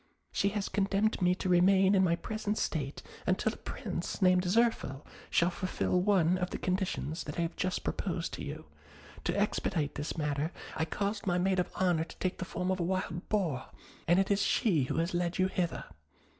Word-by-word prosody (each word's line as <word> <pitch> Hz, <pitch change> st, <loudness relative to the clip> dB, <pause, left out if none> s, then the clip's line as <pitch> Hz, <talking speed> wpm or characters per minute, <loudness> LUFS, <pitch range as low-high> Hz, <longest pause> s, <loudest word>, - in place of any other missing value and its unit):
She 200 Hz, -, +2 dB
has 205 Hz, -1 st, -2 dB
condemned 200 Hz, +1 st, +1 dB
me 180 Hz, 0 st, +4 dB
to 185 Hz, -, -4 dB
remain 190 Hz, +2 st, +5 dB
in 190 Hz, -1 st, +5 dB
my 170 Hz, -2 st, +3 dB
present 215 Hz, +3 st, -3 dB
state 145 Hz, -3 st, -2 dB, 0.2 s
until 190 Hz, +4 st, +2 dB
a -, -, -10 dB
Prince 185 Hz, -8 st, -4 dB
named 185 Hz, -1 st, +4 dB
Zirphil 185 Hz, -, +1 dB, 0.2 s
shall 170 Hz, +2 st, +3 dB
fulfil 185 Hz, 0 st, 0 dB
one 185 Hz, -3 st, +3 dB
of 180 Hz, 0 st, -1 dB
the -, -, -4 dB
conditions 185 Hz, -4 st, -2 dB
that 145 Hz, -, -6 dB
I 170 Hz, -, +1 dB
have 165 Hz, -, -3 dB
just 185 Hz, 0 st, -1 dB
proposed -, -, -2 dB
to -, -, -5 dB
you; -, -, -6 dB, 0.6 s
to -, -, +1 dB
expedite 150 Hz, -3 st, 0 dB
this 145 Hz, +3 st, -4 dB
matter, 150 Hz, +1 st, -1 dB, 0.2 s
I 160 Hz, -, 0 dB
caused 200 Hz, +5 st, -2 dB
my 175 Hz, -1 st, +2 dB
maid 185 Hz, +1 st, +2 dB
of 180 Hz, -, 0 dB
honour 175 Hz, -3 st, +2 dB
to -, -, -13 dB
take 185 Hz, -, -2 dB
the 185 Hz, -, -2 dB
form 180 Hz, +1 st, -2 dB
of 185 Hz, -, -1 dB
a -, -, +1 dB
wild 175 Hz, -1 st, -2 dB
boar, 170 Hz, -12 st, 0 dB, 0.4 s
and 175 Hz, +2 st, +5 dB
it 195 Hz, +1 st, +2 dB
is 200 Hz, 0 st, +3 dB
she 185 Hz, -, +2 dB
who -, -, -2 dB
has 165 Hz, +2 st, 0 dB
led 175 Hz, 0 st, 0 dB
you 185 Hz, -, +3 dB
hither. 180 Hz, -2 st, -1 dB
180 Hz, 200 wpm, -31 LUFS, 170-195 Hz, 0.6 s, remain